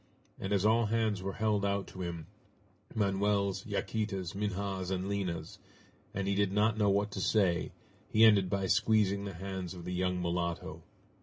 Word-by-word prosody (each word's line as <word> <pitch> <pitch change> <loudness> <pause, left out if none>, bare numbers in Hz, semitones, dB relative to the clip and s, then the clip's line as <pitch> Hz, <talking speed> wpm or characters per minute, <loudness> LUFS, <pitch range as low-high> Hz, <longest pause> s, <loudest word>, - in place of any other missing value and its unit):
And 95 - -4
as 100 0 +2
all 115 +1 +4
hands 110 -3 0
were 95 +1 -3
held 105 -2 +1
out 100 0 0
to 95 - -8
him 85 -3 -4 0.7
Manoel's, 100 -1 +1
Yaquita's, 100 -3 -2
Minha's, 100 -2 -2
and 95 0 -2
Lina's, 95 -4 -3 0.5
and 100 0 -3
he 100 - +2
did 100 -1 +1
not 105 +2 +2
know 105 -2 +2
what 100 +1 +1
to 100 - -4
say, 95 -4 +2 0.4
he 110 - +4
ended 100 -4 +5
by 100 0 0
squeezing 100 0 +2
the 100 -3 -6
hands 95 0 -5
of 85 -1 -9
the 90 - -3
young 90 0 0
mulatto. 85 -1 -2
100 Hz, 170 wpm, -32 LUFS, 95-105 Hz, 0.7 s, ended